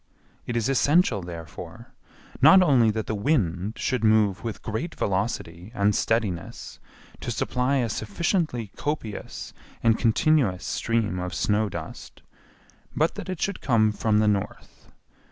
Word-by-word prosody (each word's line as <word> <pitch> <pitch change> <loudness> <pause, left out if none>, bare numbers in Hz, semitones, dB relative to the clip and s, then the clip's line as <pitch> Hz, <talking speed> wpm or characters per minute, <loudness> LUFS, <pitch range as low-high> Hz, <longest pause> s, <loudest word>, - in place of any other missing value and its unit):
It 120 - -1
is 115 - 0
essential, 135 - +3
therefore, 85 -2 -9 0.5
not 160 +7 +8
only 130 -9 +4
that 110 0 -2
the - - -3
wind 105 - 0
should 125 -3 -1
move 110 -3 +3
with 115 -2 -5
great 110 +10 -4
velocity 95 -2 -3
and 100 0 +2
steadiness 105 -8 -2 0.4
to - - -5
supply 125 +2 0
a 125 -4 +1
sufficiently 120 - -2
copious 145 -8 -5 0.3
and 115 -1 +3
continuous 115 -4 +2
stream 115 -5 -1
of 90 0 -4
snow 105 0 +1
dust, - - -9 0.7
but 160 +3 +2
that - - -7
it 185 -3 -4
should 200 -1 -2
come 110 -4 +3
from 105 0 +1
the 105 0 +3
north. 100 -2 -3
110 Hz, 135 wpm, -25 LUFS, 100-130 Hz, 0.7 s, not